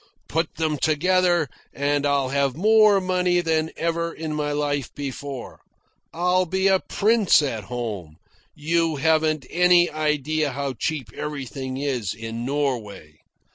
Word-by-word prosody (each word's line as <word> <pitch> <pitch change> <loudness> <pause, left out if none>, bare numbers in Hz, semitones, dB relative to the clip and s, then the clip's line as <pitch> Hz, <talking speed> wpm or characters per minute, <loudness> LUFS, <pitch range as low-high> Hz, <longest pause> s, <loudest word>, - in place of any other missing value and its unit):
Put 165 +1 -2
them 155 -2 -1
together, 175 +2 +2 0.3
and 145 +1 0
I'll 140 -2 +1
have 140 -1 0
more 215 +2 +5
money 180 -1 +1
than 160 -2 0
ever 170 0 -1
in 160 -1 -5
my 150 -1 -2
life 145 -3 -1
before. 140 -1 -6 0.5
I'll 180 +2 +1
be 190 +3 -1
a 190 -1 +4
prince 210 -7 +3
at 115 -7 -3
home. 105 -9 -5 0.4
You 165 +1 0
haven't 155 -1 +1
any 175 0 +4
idea 150 -1 -1
how 140 0 -3
cheap 130 -8 -4
everything 130 -2 -5
is 130 -8 -2
in 115 +1 -6
Norway. 115 - -3
150 Hz, 135 wpm, -23 LUFS, 135-170 Hz, 0.5 s, more